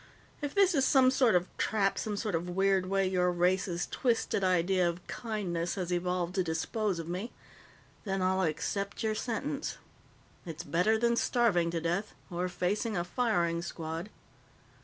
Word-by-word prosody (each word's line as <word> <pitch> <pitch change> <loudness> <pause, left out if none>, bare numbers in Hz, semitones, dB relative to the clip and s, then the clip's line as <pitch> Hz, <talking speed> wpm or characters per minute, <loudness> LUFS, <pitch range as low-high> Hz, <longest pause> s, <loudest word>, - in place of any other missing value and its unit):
If 290 -1 -4
this 390 -2 +5
is 275 -4 +3
some 260 -2 +5
sort 255 -6 +4
of 180 0 +2
trap, 200 -2 +1
some 210 -2 -3
sort 210 -1 -2
of 170 +2 -1
weird 190 0 +2
way 195 0 +1
your 180 -1 +2
race's 180 0 +1
twisted 230 -5 0
idea 180 0 +3
of 170 +1 -7
kindness 185 -7 -3
has 180 -2 -2
evolved 180 0 -1
to 190 -1 +1
dispose 180 +4 -1
of 165 -1 -5
me, 185 +7 -4 0.7
then 195 -2 -1
I'll 190 +1 +2
accept 200 +6 -2
your 220 -1 +1
sentence. 275 +7 -3 0.7
It's 165 -3 -6
better 180 +9 +2
than 235 +1 +2
starving 210 -11 +2
to 170 0 -1
death 175 +6 -2 0.2
or 180 +1 -1
facing 195 +4 -1
a 175 - 0
firing 175 -5 0
squad." 165 +2 -5
185 Hz, 160 wpm, -31 LUFS, 175-220 Hz, 0.7 s, this